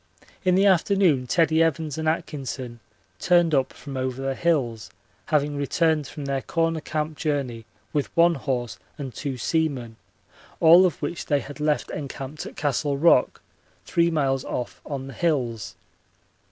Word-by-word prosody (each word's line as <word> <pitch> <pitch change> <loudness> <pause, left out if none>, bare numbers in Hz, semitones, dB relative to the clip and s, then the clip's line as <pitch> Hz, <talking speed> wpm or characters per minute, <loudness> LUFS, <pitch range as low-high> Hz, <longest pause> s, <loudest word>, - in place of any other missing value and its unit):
In 185 -1 +3
the 195 +2 +4
afternoon 185 -7 +3
Teddie 160 +2 +3
Evans 160 -2 0
and 160 0 0
Atkinson 135 -6 -4 0.4
turned 175 - +3
up 135 -2 +2
from 140 -2 -9
over 130 0 -2
the 135 0 -1
hills, 130 -9 0 0.4
having 145 -1 +1
returned 155 0 +1
from 145 0 -7
their 135 -1 -1
Corner 165 0 0
Camp 155 0 -3
journey 135 -7 -2 0.3
with 145 -2 0
one 170 +1 +6
horse 120 - -3 0.2
and 135 -4 -6
two 135 +2 -4
seamen, 130 -6 -1 0.6
all 170 +3 +8
of 160 -3 -6
which 160 +3 -4
they 145 -2 +2
had 145 +1 -9
left 150 0 0
encamped 140 0 -6
at - - -11
Castle 145 0 0
Rock, 145 -4 +4 0.4
three 170 0 +2
miles 135 -5 0
off 100 -8 -5
on 135 -2 -4
the 135 - -8
hills. 125 - -1
145 Hz, 155 wpm, -24 LUFS, 130-160 Hz, 0.6 s, all